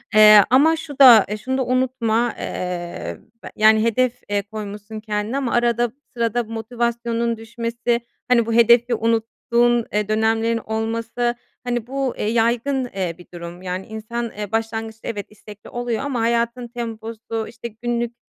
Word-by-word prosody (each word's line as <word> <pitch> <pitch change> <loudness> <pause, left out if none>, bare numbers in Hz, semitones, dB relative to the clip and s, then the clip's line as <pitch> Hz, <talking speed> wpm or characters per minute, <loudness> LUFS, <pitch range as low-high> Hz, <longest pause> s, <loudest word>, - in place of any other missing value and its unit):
Eee, 210 -1 +9
ama 290 +6 +5
şu 290 -3 -9
da 240 -6 +9 0.2
şunu 260 +1 -1
da 260 - 0
unutma, 245 -2 +1
eee, 175 - -4 0.3
be - - -8
yani, 220 0 +5
hedef, 245 +2 +1
eee, 205 0 +1
koymuşsun 210 +1 -7
kendine 215 +3 -2
ama 265 -4 -1
arada 240 -1 +2 0.2
sırada 235 0 0
motivasyonun 235 +1 -2
düşmesi, 235 +1 -2 0.3
hani, 240 -2 +4
bu 230 - -2
hedefi 235 +1 +5
unuttuğun, 230 +1 +1
eee, 210 0 0
dönemlerin 225 +1 +1
olması, 230 +2 -2 0.3
hani 240 -1 -2
bu, 270 -1 -2
eee, - - -2
yaygın, 240 +4 +1
eee, 180 -4 -2
bir 175 - -15
durum. 170 +1 -8
Yani 185 +1 -4
insan, 225 +2 -5
eee, 210 -1 -5
başlangıçta 225 0 -3
evet 205 -3 -4
istekli 210 0 -13
oluyor 240 -2 -3
ama 265 -5 -2
hayatın 235 +1 0
temposu, 225 -1 -5
işte 235 0 -8
günlük, 240 -1 -2
230 Hz, 150 wpm, -21 LUFS, 220-240 Hz, 0.3 s, Eee